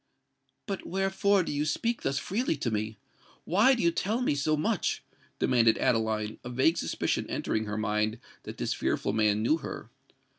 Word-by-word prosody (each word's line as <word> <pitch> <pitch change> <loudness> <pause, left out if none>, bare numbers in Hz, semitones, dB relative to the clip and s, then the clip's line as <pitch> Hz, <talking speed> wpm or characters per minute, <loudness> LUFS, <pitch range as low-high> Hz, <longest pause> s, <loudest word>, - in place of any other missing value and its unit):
"But 195 -3 -5
wherefore 195 +1 +2
do - - -4
you 145 0 0
speak 230 +10 -1
thus 135 - -1
freely 195 - -1
to 120 -4 -2
me? 110 0 -2 0.5
why 215 +10 +4
do 235 - -2
you 170 - +4
tell 210 +7 -1
me 250 - +1
so 150 +2 +1
much?" 150 - 0 0.3
demanded 115 -2 +3
Adeline, 110 -2 0
a 120 - -6
vague 130 +7 +2
suspicion - - -1
entering 110 0 -1
her 105 0 -4
mind 110 +1 0 0.2
that - - -9
this - - -1
fearful - - -1
man 105 -1 +2
knew 155 +8 +3
her. - - -7
140 Hz, 175 wpm, -29 LUFS, -, 0.5 s, why